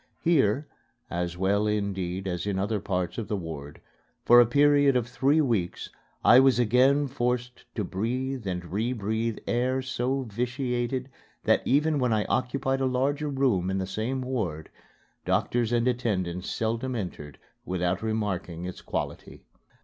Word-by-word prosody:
Here 145 -5 +2 0.4
(as 85 0 -2
well, 100 +3 +1
indeed, 95 -3 -2
as 90 +2 -3
in 100 -2 -1
other 105 +2 0
parts 90 +1 -2
of 110 - -4
the 105 - -1
ward) 75 -5 -7 0.5
for 120 +1 +8
a 120 - +4
period 145 +1 +4
of 120 -2 +1
three 140 +5 +2
weeks 110 - -1 0.3
I 120 - +8
was 135 -2 +5
again 130 +5 +4
forced 125 -2 -2
to 105 - -1
breathe 120 +5 -3
and 90 -1 -2
rebreathe 110 +1 -1
air 130 +2 0
so 130 +1 -1
vitiated 125 +2 -2 0.4
that - - +3
even 150 +2 +2
when 125 -3 +2
I 105 -1 +1
occupied 135 +1 0
a 135 - +2
larger 140 +4 0
room 125 -10 +1
in 95 - -1
the 95 - -1
same 110 +7 -2
ward, 100 -12 -3 0.5
doctors 120 -1 0
and 120 0 +2
attendants 95 -8 -1
seldom 115 +3 -2
entered 85 - -6 0.3
without 90 0 -1
remarking 100 -6 -2
its 90 - -7
quality. - - -5
115 Hz, 150 wpm, -27 LUFS, 95-130 Hz, 0.5 s, for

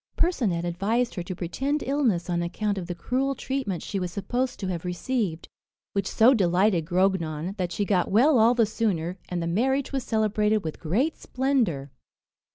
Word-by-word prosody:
Percinet 220 - +1
advised 210 +8 0
her 180 - -4
to 180 +1 -5
pretend 270 - -2
illness 250 -11 +1
on 175 -1 0
account 200 +4 -2
of 175 - -6
the 175 - -4
cruel 265 +9 -1
treatment 260 -12 -3
she 200 - -3
was 180 -1 -3
supposed 245 +7 -2
to 195 - -4
have 175 -3 -3
received; 180 -1 -2 0.5
which 195 -2 -1
so 235 +4 +5
delighted 185 -4 +2
Grognon, 180 -2 0
that 180 -2 -2
she 205 - -1
got 185 -3 +1
well 250 +6 +5
all 230 +3 +5
the 230 -2 +4
sooner, 190 -5 -1
and 175 -1 -2
the - - -2
marriage 260 +10 0
was 270 -2 -1
celebrated 215 -2 +1
with 160 -1 -5
great 230 - 0
splendour. 235 - 0
200 Hz, 175 wpm, -26 LUFS, 175-245 Hz, 0.5 s, so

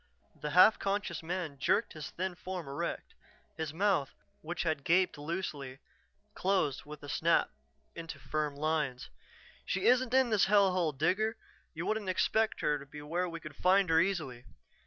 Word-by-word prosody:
The 150 - -5
half 185 +7 +6
conscious 195 -4 -2
man 165 -4 -4
jerked - - +1
his 155 -2 -7
thin 185 +1 -3
form 180 -2 -6
erect. 140 +1 -4 0.4
His 160 -2 -3
mouth, 175 -4 +1 0.3
which 175 +3 -3
had 155 -4 -1
gaped 180 +4 +3
loosely, 145 -4 -5 0.6
closed 185 -10 0
with 150 -1 -10
a - - -8
snap - - +2 0.4
into 165 -1 -7
firm 150 -2 -2
lines. 150 -4 -2 0.5
"She 190 +1 -2
isn't 250 +1 +4
in 260 -3 +4
this 210 -3 +4
hell 200 -1 +4
hole, 175 -4 +1
Digger. 185 +10 0 0.4
You 165 +3 -4
wouldn't 215 -3 -1
expect 220 +4 +1
her 150 -1 +1
to 140 - -10
be 150 +1 -10
where 175 +4 -1
we 165 0 -6
could 155 -2 -10
find 190 0 +3
her 160 - +5
easily." 155 -10 -1
170 Hz, 165 wpm, -32 LUFS, 150-190 Hz, 0.6 s, half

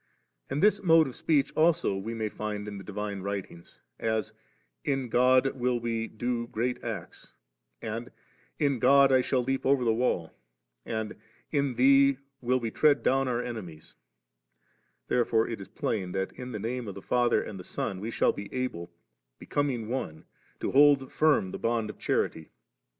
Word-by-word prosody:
And 145 - -1
this 210 -1 +4
mode 165 -3 +6
of 130 - -7
speech 150 -4 +1
also 165 - +3
we 110 +4 -4
may 110 -1 -2
find 105 0 -5
in 100 -1 -6
the - - -9
divine 105 0 -4
writings, 95 -3 -6 0.2
as 110 -3 -1 0.5
*In 135 -3 -1
God 130 +3 +4
will 125 -1 0
we 115 -1 -2
do 120 +1 -3
great 120 +2 -2
acts;* 110 -7 -7 0.5
and 115 +3 -4 0.5
*In 140 -4 +1
God 135 +2 +6
I 130 -1 +5
shall 125 0 0
leap 135 +2 -1
over 135 -1 +3
the 115 - +4
wall3;' 110 -8 0 0.6
and 110 -1 -3 0.4
'In 140 -4 0
Thee 135 +1 +5 0.2
will 125 +1 +1
we 115 -2 -3
tread 145 +2 +3
down 135 0 +2
our 120 -1 -1
ene 120 - -3
miesl' 80 -3 -13 1.1
Therefore 115 -2 +2
it 115 -4 -5
is 95 - -9
plain, 95 -5 -3
that 95 0 -2
in 125 0 -8
the 110 - -4
Name 115 +3 -3
of 100 -1 -8
Father 120 -1 +2
and 95 -3 -8
Son 95 +1 -4
we 110 +4 -4
shall - - +2
be 100 - -8
able, 125 -10 -4 0.5
becoming 130 -6 -2
one, 110 -11 -4 0.4
to - - -1
hold 140 -1 +5
firm 150 -12 +2
the - - -6
bond 115 -2 0
of - - -20
charity. 80 - -1
120 Hz, 170 wpm, -28 LUFS, 105-135 Hz, 1.1 s, mode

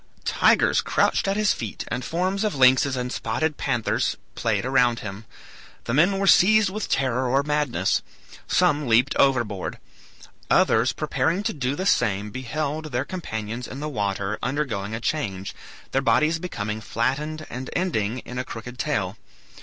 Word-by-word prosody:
Tigers - - +3
crouched - - +1
at 195 +1 0
his 210 -1 +3
feet, 110 -3 -6
and 120 +2 -3
forms 185 - -1
of 210 -7 0
lynxes 130 +1 +4
and 125 0 -3
spotted 160 -2 -1
panthers 120 -5 0 0.2
played - - -1
around 125 -3 +2
him. 105 0 -7 0.6
The 120 - -3
men 175 +8 +4
were 195 - 0
seized 205 +1 +5
with 215 +2 -4
terror 130 -1 +1
or 135 +3 +2
madness; 145 -10 0 0.5
some 145 -1 +2
leaped 120 +4 +3
overboard; 120 -8 +1 0.7
others - - +4
preparing 175 +5 -1
to 225 - -1
do 135 -2 -2
the 185 - -3
same 105 - +1
beheld 145 +6 -3
their 130 -3 -2
companions 115 - -5
in 135 - -7
the 150 - -3
water 100 -4 -2
undergoing 115 -6 -2
a - - -4
change, 100 -9 -3 0.4
their 135 - +1
bodies 155 +4 +2
becoming 110 - -4
flattened 145 +8 -2
and 130 +2 -6
ending 125 - -1
in 125 0 -5
a - - -1
crooked 125 +1 -8
tail. 105 -9 -1
130 Hz, 155 wpm, -24 LUFS, 115-155 Hz, 0.7 s, seized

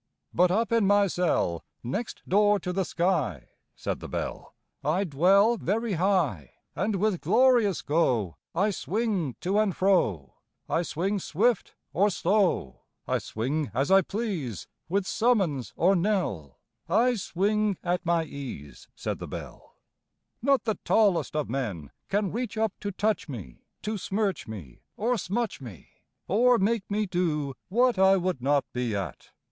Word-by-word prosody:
But 180 +1 +4
up 225 +6 +1
in 230 -4 +3
my 205 0 +5
cell 170 - 0 0.2
Next 200 - -4
door 205 +1 +4
to 180 - -3
the 190 0 0
sky, 160 - -1 0.3
Said - - -3
the - - -8
Bell, - - -5 0.3
I 160 +7 +1
dwell 195 +8 +4
Very 215 +4 -1
high; 165 - 0 0.2
And 205 +3 0
with 195 -2 0
glorious 225 - +3
go 125 - +1 0.2
I 205 +4 +2
swing 195 - -1
to 195 +4 +1
and 210 -4 +1
fro; 105 - +1 0.3
I 165 - +1
swing 185 +5 -1
swift 220 +8 0 0.2
or 200 +4 +3
slow, 185 - +1 0.3
I - - +1
swing 140 +7 -2
as 135 +8 +1
I 195 0 +7
please, 185 - -4 0.2
With 195 +2 +1
summons 190 - +1
or 190 +4 +3
knell; 170 - -1 0.3
I 245 +2 +4
swing 205 0 0
at 175 0 0
my 170 -1 +2
ease, 135 - -8
Said - - -4
the - - -6
Bell: - - -9 0.7
Not 275 +2 +3
the 220 -2 -2
tallest 200 -8 +2
of 150 -2 0
men 105 - -4 0.2
Can 200 -1 0
reach 230 -2 -3
up 220 -2 +1
to 205 - -3
touch 210 -2 -1
me, 100 - -9 0.2
To 215 -1 -2
smirch 195 -2 -1
me 95 - -9 0.2
or 240 +4 +1
smutch 220 -2 -2
me, 115 - -11 0.4
Or 240 +6 +4
make 210 +1 0
me 210 +1 0
do 160 -7 -1 0.2
what 240 +1 +3
I 190 0 +6
would 180 -7 -1
not 140 +2 +2
be 125 -3 -1
at! 95 -2 -5
185 Hz, 150 wpm, -27 LUFS, 145-210 Hz, 0.7 s, I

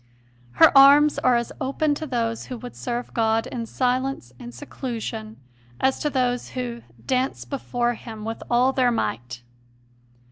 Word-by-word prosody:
Her 120 - +6
arms 285 +2 +7
are 250 -1 +3
as 235 0 -1
open 290 +3 0
to 310 +2 -5
those 230 -3 -2
who 250 - -6
would 245 +1 -9
serve 240 0 -4
God 225 0 +1
in 230 -2 -5
silence 255 - -1
and 120 - -8
seclusion 220 - -6 0.4
as 265 0 +1
to 300 - 0
those 250 -3 -1
who 240 -2 -4 0.2
"dance 260 0 -1
before 245 -3 -2
Him 220 -2 -9
with 225 0 -5
all 250 +2 +3
their 255 -2 +3
might. 120 - -3
245 Hz, 150 wpm, -23 LUFS, 225-265 Hz, 0.4 s, arms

